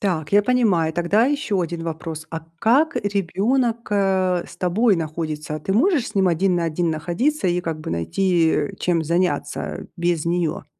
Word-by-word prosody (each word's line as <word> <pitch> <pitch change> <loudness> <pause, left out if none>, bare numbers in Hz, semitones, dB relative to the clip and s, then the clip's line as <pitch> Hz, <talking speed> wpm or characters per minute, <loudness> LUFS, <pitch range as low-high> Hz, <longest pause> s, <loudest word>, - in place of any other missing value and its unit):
Так. 175 -5 -2
Я 205 - +6
понимаю. 205 -9 +2
Тогда 175 +7 +2
еще 280 -9 0
1 170 0 -4
вопрос. 160 -1 -5
А 165 - -4 0.2
как 275 +9 +3
ребенок, 220 +5 0
э, 190 -3 +1
с - - -13
тобой 200 +4 +2
находится? 155 -1 -4
Ты 190 +6 -3
можешь 285 - +2
с 215 - -12
ним 190 -2 +3
один 180 +2 +2
на 170 - 0
один 165 +1 0
находиться 185 - -1
и 175 0 +1
как 160 -2 -4
бы - - -6
найти, 160 - +1
э, 200 - 0
чем 170 -2 +1
заняться 175 +3 -2
без 170 -2 0
нее? 170 -1 -1
180 Hz, 170 wpm, -22 LUFS, 165-205 Hz, 0.2 s, Я